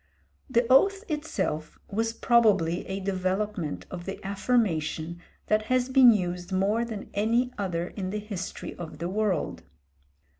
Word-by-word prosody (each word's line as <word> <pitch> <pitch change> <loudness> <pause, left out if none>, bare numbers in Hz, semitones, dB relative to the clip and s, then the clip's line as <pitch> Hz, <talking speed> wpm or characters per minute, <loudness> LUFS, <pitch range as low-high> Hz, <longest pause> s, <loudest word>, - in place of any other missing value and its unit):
The 235 -1 +3
oath 390 - +5
itself 205 - -3
was 225 +2 -1
probably 215 -8 +3
a 190 +1 -3
development 190 -2 -2
of 175 -1 -6
the 195 - -5
affirmation 175 -6 0 0.2
that 215 0 +1
has 255 +2 +1
been 260 -1 +8
used 180 -3 -2
more 200 +5 +2
than 220 -4 -6
any 235 +5 +1
other 180 -4 -2
in 190 -3 -5
the 210 - -2
history 205 -3 -6
of 160 -3 -7
the 170 +3 -3
world. 200 -4 -1
200 Hz, 140 wpm, -27 LUFS, 180-230 Hz, 0.2 s, been